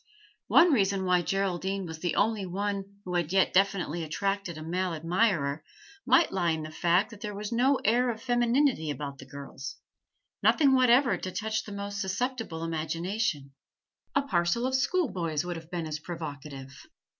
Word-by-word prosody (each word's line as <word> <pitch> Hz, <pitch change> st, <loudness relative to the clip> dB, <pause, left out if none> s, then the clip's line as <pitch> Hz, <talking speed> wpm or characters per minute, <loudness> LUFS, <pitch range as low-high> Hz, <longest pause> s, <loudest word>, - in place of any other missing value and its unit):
One 340 Hz, 0 st, +6 dB
reason 195 Hz, -5 st, +2 dB
why 180 Hz, -1 st, +3 dB
Geraldine 195 Hz, +1 st, -1 dB
was 160 Hz, -2 st, -7 dB
the 175 Hz, 0 st, -1 dB
only 215 Hz, 0 st, +1 dB
one 200 Hz, +1 st, -4 dB
who 180 Hz, -, -4 dB
had 175 Hz, -2 st, 0 dB
yet 190 Hz, 0 st, +3 dB
definitely 185 Hz, -4 st, +1 dB
attracted 195 Hz, +2 st, -2 dB
a 155 Hz, -, -7 dB
male 180 Hz, +1 st, -1 dB
admirer 165 Hz, -3 st, +1 dB, 0.4 s
might 340 Hz, -, +5 dB
lie 180 Hz, -3 st, +1 dB
in 160 Hz, -1 st, -1 dB
the 155 Hz, -, -7 dB
fact 175 Hz, +7 st, +2 dB
that 210 Hz, -2 st, -12 dB
there 210 Hz, -1 st, -5 dB
was 205 Hz, +2 st, -5 dB
no 255 Hz, +4 st, +3 dB
air 245 Hz, +4 st, +3 dB
of 225 Hz, -2 st, -3 dB
femininity 240 Hz, -, +2 dB
about 140 Hz, -1 st, -5 dB
the 135 Hz, -, -11 dB
girls, 135 Hz, -1 st, -8 dB, 0.7 s
nothing 280 Hz, -4 st, +4 dB
whatever 250 Hz, -4 st, +5 dB
to 185 Hz, -, -5 dB
touch 220 Hz, +2 st, -2 dB
the 210 Hz, -, -8 dB
most 200 Hz, 0 st, -4 dB
susceptible 195 Hz, -4 st, -2 dB
imagination; 165 Hz, -1 st, -2 dB, 0.6 s
a 280 Hz, -, +3 dB
parcel 180 Hz, 0 st, +1 dB
of 260 Hz, -, -1 dB
schoolboys 200 Hz, -, 0 dB
would 175 Hz, -1 st, -3 dB
have 165 Hz, -1 st, -9 dB
been 175 Hz, -2 st, -3 dB
as 155 Hz, -1 st, -4 dB
provocative. 140 Hz, -5 st, -8 dB
185 Hz, 165 wpm, -28 LUFS, 160-220 Hz, 0.7 s, One